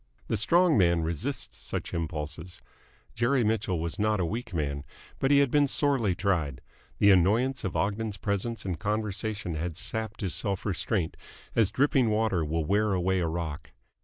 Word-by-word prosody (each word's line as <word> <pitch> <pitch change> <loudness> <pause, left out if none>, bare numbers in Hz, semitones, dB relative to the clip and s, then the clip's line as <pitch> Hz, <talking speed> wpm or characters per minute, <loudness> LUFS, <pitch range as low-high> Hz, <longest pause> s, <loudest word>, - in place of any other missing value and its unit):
The - - +1
strong 170 - +4
man 85 -2 +3
resists 80 -1 -3
such - - -4
impulses. 80 +1 -4 0.5
Jerry 120 +2 +2
Mitchell 105 -5 0
was 85 +3 -4
not 105 0 +2
a 90 - +1
weak 115 +8 -4
man, 70 -4 -2 0.4
but 135 - +1
he 140 - +6
had 140 -3 +3
been 145 -1 +4
sorely 135 -9 +2
tried. 80 -10 0 0.4
The 100 - +6
annoyance 110 +9 +3
of 95 - -3
Ogden's 105 +1 -1
presence 100 +3 -2
and 90 -5 -3
conversation 105 -2 -2
had 80 +1 -3
sapped 110 +2 -4
his 95 -5 -1
self 100 -3 0
restraint, 95 -3 -1 0.4
as 110 -4 +4
dripping 135 -3 +2
water 105 -5 +1
will 80 +1 -1
wear 105 +4 +2
away 95 +1 +1
a 85 - 0
rock. 80 -3 -5
100 Hz, 165 wpm, -28 LUFS, 85-110 Hz, 0.5 s, he